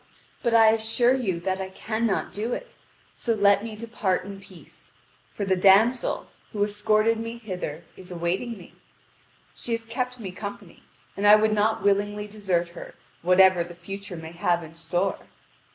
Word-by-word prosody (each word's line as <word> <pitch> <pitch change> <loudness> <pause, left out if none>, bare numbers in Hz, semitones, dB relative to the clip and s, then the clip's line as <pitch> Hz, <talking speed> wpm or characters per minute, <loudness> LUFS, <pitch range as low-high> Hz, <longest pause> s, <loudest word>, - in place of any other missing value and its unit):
But 235 -2 +1
I 225 -1 +7
assure 225 +3 +2
you 205 -10 -1
that 190 +1 -1
I 190 - -4
cannot 220 +2 -2
do 225 +4 -2
it: - - -7 0.4
so 230 -2 0
let 200 -1 +4
me 225 -2 -6
depart 215 -5 -2
in 195 -1 -8
peace. 185 -3 -14 0.4
For 200 - -4
the 190 -1 +2
damsel, 200 +7 +4 0.3
who 205 -1 0
escorted 215 +2 +2
me 230 +1 -5
hither, 180 -8 -6
is 185 - -11
awaiting 180 +7 -2
me. 180 - -14 0.8
She 235 - -5
has 230 0 -3
kept 250 +2 -3
me 195 -5 -6
company, 200 +2 -8 0.3
and 205 +1 +1
I 210 - +10
would 215 0 +3
not 215 +1 +1
willingly 205 +1 +1
desert 190 -5 -1
her 170 - -10 0.3
whatever 180 0 +5
the 175 0 -11
future 195 +1 -8
may 160 0 -8
have 170 0 0
in 160 0 -11
store." 175 +4 -1
205 Hz, 170 wpm, -25 LUFS, 185-225 Hz, 0.8 s, I